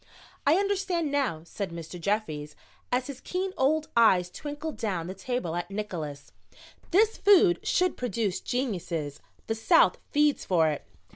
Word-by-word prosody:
"I 295 - +6
understand 380 -5 0
now," 255 - 0
said 195 +3 -5
Mr. 170 +1 -8
Jeffries, 160 -7 -2 0.4
as 250 +1 +1
his 275 -2 -8
keen 370 +1 -3
old 305 +4 +2
eyes 185 -6 +5
twinkled 295 - -6
down 190 -8 -2
the 185 - -5
table 195 -4 -3
at 175 +1 -3
Nickols. 160 -9 -5 0.6
"This 425 +5 +3
food 395 -3 +6
should 365 -2 +1
produce 225 -5 -1
geniuses. 175 - -3 0.3
The 225 - -1
South 225 +10 +4
feeds 295 -1 +3
for 165 -4 +3
it." 150 - -5
225 Hz, 145 wpm, -28 LUFS, -, 0.6 s, I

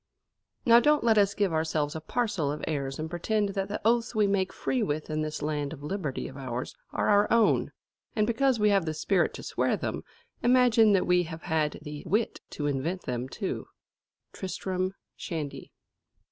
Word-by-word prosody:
"Now 235 0 +8
don't 300 +4 +3
let 225 -2 +5
us 200 0 +3
give 200 -5 +1
ourselves 160 -2 0
a 160 - -4
parcel 185 -6 -1
of 150 - -5
airs 140 -3 -2
and 155 - -3
pretend 200 +5 0
that 195 0 -2
the 205 - -3
oaths 230 0 +2
we 215 -1 +4
make 195 -2 +1
free 255 - -1
with 155 -6 -2
in 155 0 -1
this 155 -1 -3
land 150 -1 -2
of 145 -3 -10
liberty 155 -4 -3
of 135 - -10
ours 130 -2 -5 0.2
are - - 0
our 205 0 +4
own; 230 -2 +3 0.4
and 215 - +3
because 235 +2 +2
we 210 0 +4
have 195 -4 +3
the 155 -1 -2
spirit 180 +3 +1
to - - -8
swear - - 0
them, - - -3 0.4
imagine 240 -3 +5
that 190 - +3
we 180 0 +4
have 165 0 -8
had 155 -2 0
the 150 -1 -7
wit 215 +6 0
to 150 - -4
invent 145 +6 -1
them 125 +1 -3
too." - - -4 0.7
_Tristram 185 0 -3 0.2
Shandy. 155 -5 -5
185 Hz, 190 wpm, -28 LUFS, 150-215 Hz, 0.7 s, Now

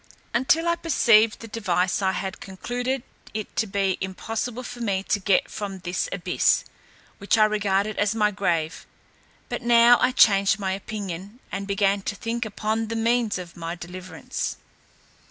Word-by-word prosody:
Until 310 +8 +2
I 340 0 +2
perceived 230 -10 +4
the 230 - -8
device 190 -4 0
I 190 -1 +1
had 190 -1 -4
concluded 245 +6 -3 0.3
it 215 -1 -5
to 220 - 0
be 195 -1 0
impossible 225 +6 -4
for 245 0 -8
me 200 -5 -1
to 205 - 0
get 195 -1 +2
from 200 -2 -5
this 185 - -3
abyss, - - +1 0.5
which 200 +3 +2
I 215 - +6
regarded 210 -1 0
as 205 +1 +1
my 210 -1 +2
grave; 170 -5 -1 0.6
but - - -4
now 240 0 +6
I 250 - +4
changed 200 -4 +5
my 195 -2 -2
opinion, 200 +1 -6
and 195 +1 -4
began 200 0 +1
to 205 - -4
think 230 +3 -3
upon 220 +1 -2
the 230 - -4
means 230 -1 +1
of 175 -2 -8
my 165 0 -5
deliverance. 180 +1 -6
205 Hz, 160 wpm, -24 LUFS, 190-230 Hz, 0.6 s, I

